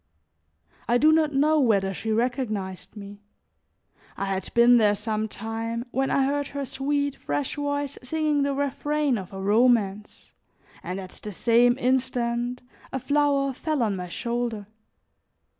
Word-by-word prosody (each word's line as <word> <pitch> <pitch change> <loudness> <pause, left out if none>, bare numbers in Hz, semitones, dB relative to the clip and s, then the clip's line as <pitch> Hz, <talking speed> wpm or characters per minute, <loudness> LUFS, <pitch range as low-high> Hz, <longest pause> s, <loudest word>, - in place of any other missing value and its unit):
I 240 - +3
do 305 +5 +5
not 315 -1 +3
know 300 +3 +3
whether 200 -7 +2
she 220 +4 -4
recognized 215 -6 -2
me; 200 0 -10 1.0
I 195 - -2
had 195 -1 -3
been 240 +1 +7
there 210 -2 +4
some 215 +1 -2
time 225 +2 -4
when 270 +1 0
I 275 - +2
heard 285 +1 -1
her 280 -1 -4
sweet, 285 +2 -1
fresh 145 -1 -3
voice 285 -1 -3
singing 300 +2 0
the 280 0 0
refrain 285 -1 0
of 185 - -9
a 195 - -7
romance, 210 -1 +1 0.5
and 185 +2 -5
at 185 -1 -8
the 210 - -7
same 240 +5 +3
instant 250 -1 -1 0.3
a - - -2
flower 280 0 +1
fell 300 0 -1
on 210 -3 0
my 180 -1 -6
shoulder. 235 0 -3
245 Hz, 145 wpm, -25 LUFS, 210-280 Hz, 1.0 s, been